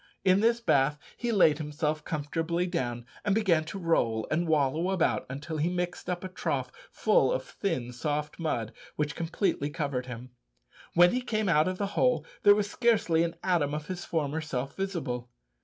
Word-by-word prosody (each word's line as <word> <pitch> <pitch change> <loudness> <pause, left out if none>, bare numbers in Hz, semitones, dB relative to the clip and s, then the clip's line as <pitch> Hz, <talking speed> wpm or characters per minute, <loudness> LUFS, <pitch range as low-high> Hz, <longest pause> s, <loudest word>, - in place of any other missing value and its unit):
In 185 +1 +5
this 230 +2 +3
bath 150 -9 +2 0.2
he 240 -1 -2
laid 160 -8 +4
himself 150 0 -2
comfortably 165 +3 -1
down, 120 -10 -2 0.2
and 205 -1 +2
began 185 -8 +3
to 180 - -6
roll 120 - +1
and 170 +2 +1
wallow 155 +3 +2
about 190 -3 +1
until 145 +4 -5
he 155 +3 +1
mixed 180 0 -3
up 180 0 -2
a - - -3
trough 185 - -2 0.2
full - - +3
of - - -1
thin 165 - -3
soft 150 +5 -3
mud, 120 -9 -2 0.2
which 150 0 -1
completely 165 -3 -1
covered 140 -4 -3
him. 125 0 -8 0.6
When 175 +1 +7
he 250 - 0
came 215 -4 -1
out 155 -2 +4
of 185 0 -2
the 200 - -1
hole 250 -1 +2 0.2
there 205 -1 +7
was 205 -1 0
scarcely 210 -7 +2
an 170 0 -2
atom 160 -6 +1
of 150 0 -4
his 180 0 -5
former 155 -1 -1
self 135 -3 -4
visible! 145 -11 -3
165 Hz, 180 wpm, -29 LUFS, 145-185 Hz, 0.6 s, When